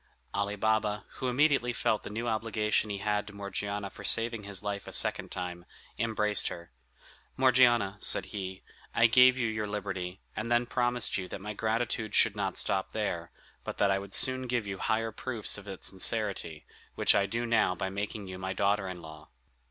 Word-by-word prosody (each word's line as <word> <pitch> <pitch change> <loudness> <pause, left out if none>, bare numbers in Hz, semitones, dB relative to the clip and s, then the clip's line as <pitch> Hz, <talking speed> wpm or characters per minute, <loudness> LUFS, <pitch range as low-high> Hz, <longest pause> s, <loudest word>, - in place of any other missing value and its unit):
Ali 100 0 -1
Baba, 110 0 0
who 130 - -1
immediately 125 -1 +3
felt 110 -2 +1
the - - -8
new 115 +3 -3
obligation 110 -1 0
he 100 - -2
had 105 +1 -1
to 105 - -9
Morgiana 100 0 -4
for - - -11
saving 115 -2 +2
his 100 -1 -5
life 100 -1 -4
a - - -8
second - - 0
time, 90 -1 -5 0.4
embraced 105 -3 +1
her: 85 -6 -7 0.7
"Morgiana," 120 -6 +4
said - - +1
he, 95 -2 -5 0.3
"I 115 - +5
gave 125 +2 +7
you 120 -3 +1
your 110 -1 -2
liberty, 95 -3 -4 0.2
and 115 +2 -3
then 120 0 +3
promised 120 -3 0
you 90 - -5
that - - -6
my 105 +2 -5
gratitude 110 0 -1
should 110 -3 +4
not 100 -3 -2
stop 95 -1 0
there, 85 -6 -2 0.3
but - - -5
that 100 - +3
I 95 - +2
would 100 0 -2
soon 130 0 +4
give 120 -3 0
you 95 -1 -5
higher 115 0 0
proofs 110 -2 -2
of 105 - -14
its 95 -2 -4
sincerity, 95 -5 -1 0.3
which - - +4
I 100 - +2
now 115 -3 +1
do - - -19
by 95 +2 -2
making 100 +1 -4
you 95 0 -7
my 95 0 -3
daughter 100 0 +1
in 90 -2 -7
law." 80 -1 -11
105 Hz, 190 wpm, -30 LUFS, 95-115 Hz, 0.7 s, gave